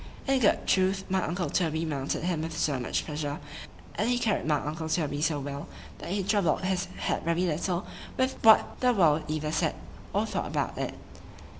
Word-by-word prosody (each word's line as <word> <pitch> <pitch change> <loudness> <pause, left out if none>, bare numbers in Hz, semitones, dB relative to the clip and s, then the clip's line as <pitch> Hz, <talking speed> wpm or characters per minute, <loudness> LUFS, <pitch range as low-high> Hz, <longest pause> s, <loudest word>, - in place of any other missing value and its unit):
In 270 -1 +3
good 220 - +3
truth, 190 0 +2
my 190 0 +2
uncle 175 +2 -1
Toby 160 -2 0
mounted 140 -1 -2
him 175 -3 0
with 160 0 -4
so 140 -4 +1
much 125 - -1
pleasure, 150 -1 -3 0.6
and 220 - 0
he 245 - +2
carried 220 -8 0
my 150 - +4
uncle 160 +2 -4
Toby 150 -3 0
so 150 -1 +1
well,——that 140 +3 -8
he 195 +2 0
troubled 195 -5 +2
his 185 0 0
head - - -1
very 170 +1 0
little 175 +2 0 0.3
with 260 0 +1
what 220 -1 +6
the 250 -1 +4
world 160 -7 +4
either 155 0 -2
said 155 - +1 0.4
or - - +1
thought - - -2
about - - -1
it. - - -3
165 Hz, 185 wpm, -28 LUFS, 150-190 Hz, 0.6 s, what